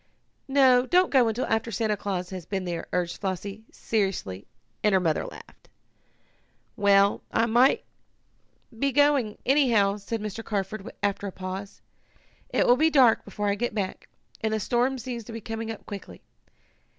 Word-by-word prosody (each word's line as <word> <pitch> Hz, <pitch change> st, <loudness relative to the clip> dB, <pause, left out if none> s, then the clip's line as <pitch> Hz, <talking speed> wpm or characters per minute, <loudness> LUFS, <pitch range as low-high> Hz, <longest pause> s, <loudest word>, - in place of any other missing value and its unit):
"No, 260 Hz, -2 st, +4 dB
don't 360 Hz, +5 st, +3 dB
go 255 Hz, -4 st, +5 dB
until 225 Hz, +3 st, -1 dB
after 225 Hz, +1 st, 0 dB
Santa 215 Hz, 0 st, 0 dB
Claus 190 Hz, -3 st, -4 dB
has 180 Hz, -3 st, -7 dB
been 190 Hz, -2 st, -3 dB
here," 170 Hz, -2 st, -4 dB
urged 175 Hz, -1 st, -2 dB
Flossie 200 Hz, +2 st, -4 dB
seriously, 190 Hz, -, -2 dB, 0.4 s
and 210 Hz, -, +3 dB
her 190 Hz, -, +5 dB
mother 165 Hz, -4 st, 0 dB
laughed. -, -, -14 dB, 1.1 s
"Well, 200 Hz, -1 st, +4 dB
I 225 Hz, -, +2 dB
must 240 Hz, +4 st, +4 dB, 1.0 s
be 275 Hz, +2 st, +1 dB
going, 280 Hz, -6 st, +3 dB
anyhow," 235 Hz, -8 st, +3 dB
said 215 Hz, +3 st, -4 dB
Mr. 215 Hz, +1 st, -5 dB
Carford, 205 Hz, +1 st, -4 dB
after 200 Hz, 0 st, -1 dB
a -, -, -5 dB
pause. 190 Hz, +2 st, -7 dB, 0.7 s
"It -, -, +2 dB
will 245 Hz, -, +5 dB
be 315 Hz, +3 st, +4 dB
dark 260 Hz, -7 st, +5 dB
before 205 Hz, 0 st, -2 dB
I -, -, +2 dB
get 225 Hz, +2 st, -3 dB
back, 195 Hz, -3 st, -4 dB, 0.3 s
and 220 Hz, -, +1 dB
the -, -, -1 dB
storm 245 Hz, +5 st, +1 dB
seems 240 Hz, -1 st, -5 dB
to 230 Hz, -, -9 dB
be 225 Hz, -, -5 dB
coming 225 Hz, +1 st, -5 dB
up 225 Hz, -, -7 dB
quickly. 200 Hz, -2 st, -9 dB
215 Hz, 165 wpm, -26 LUFS, 195-240 Hz, 1.1 s, go